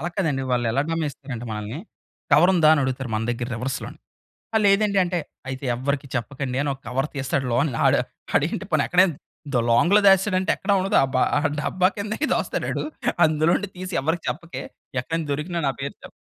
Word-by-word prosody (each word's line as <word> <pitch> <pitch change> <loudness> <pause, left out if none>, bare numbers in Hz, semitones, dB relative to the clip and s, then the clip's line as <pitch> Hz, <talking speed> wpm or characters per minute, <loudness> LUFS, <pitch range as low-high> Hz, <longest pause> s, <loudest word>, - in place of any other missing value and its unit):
అలా 175 - -2
కాదండి. 150 -8 0
వాళ్ళు 120 -1 +1
ఎలా 140 +4 +2
గమనిస్తారంటే 140 -6 -4
మనల్ని, 105 +5 -5 0.5
కవరుందా 165 +1 +6
అని 150 - +1
అడుగుతారు. 130 0 -3
మన 110 - -1
దగ్గర 120 +1 -3
రివర్స్‌ 130 +3 -2
లోని. - - -9 0.6
ఆ! - - +5
లేదండి 200 0 +3
అంటే, 175 0 -1 0.3
అయితే 130 +1 -5
ఎవ్వరికి 140 +2 -2
చెప్పకండి 130 +1 -3
అనొక 140 -2 -2
కవర్ 135 +4 -1
తీస్తాడు. 135 0 -1
లోన్ 140 +5 +2 0.2
ఆడు - - +4 0.4
ఆడేంటి - - +1
పోనీ - - +2
ఎక్కడైనా 180 -2 +4 0.4
ద - - +4
లాంగ్‌లో 175 - +5
దాచేసాడంటే 190 -1 +4
ఎక్కడా 200 +1 +1
ఉండదు. 190 +1 +1
అబ్బా! 130 -1 +1 0.2
ఆ - - +1 0.2
డబ్బా 185 +4 +2
కిందే 210 +1 -3 0.2
దాస్తాడాడు. - - -2 0.4
అందులో 155 +1 +2
నుండి 205 -2 -5
తీసి 185 0 -6
ఎవరికీ 165 +4 -1
చెప్పకే 145 -6 -6 0.4
ఎక్కడైన 165 +5 -3
దొరికినా 165 +4 -2
నా - - +1
పేరు 140 +1 -4
చెప్ - - -9
145 Hz, 175 wpm, -23 LUFS, 130-180 Hz, 0.6 s, కవరుందా